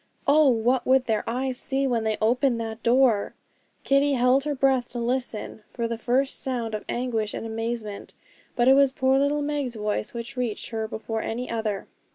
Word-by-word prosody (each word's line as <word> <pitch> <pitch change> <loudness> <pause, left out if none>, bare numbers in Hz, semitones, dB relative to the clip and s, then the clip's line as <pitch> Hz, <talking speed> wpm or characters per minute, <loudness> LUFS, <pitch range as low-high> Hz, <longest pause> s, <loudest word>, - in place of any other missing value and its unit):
Oh! 295 0 +5
what 240 +1 +1
would 260 0 +4
their 220 -3 0
eyes 255 +2 -2
see 275 0 0
when 240 -4 0
they 220 -1 0
opened 240 +2 +2
that 225 0 -5
door? 235 -3 +3 0.5
Kitty 280 +1 +3
held 255 +2 +3
her 295 -1 -1
breath 265 -2 +2
to - - -4
listen 235 -3 -3
for 235 -2 -3
the 230 - -2
first 255 +4 0
sound 240 -4 -2
of 210 - -3
anguish 230 -4 -2
and - - -5
amazement; 225 -2 -5 0.4
but 240 0 +2
it 265 - +8
was 275 -1 +5
poor 265 0 +2
little 290 +1 +1
Meg's 285 -4 -2
voice 210 0 -2
which 235 +3 -7
reached 245 -4 -3
her 220 -1 -2
before 220 0 -4
any 245 +3 -4
other. 220 -3 -2
245 Hz, 190 wpm, -25 LUFS, 225-265 Hz, 0.5 s, it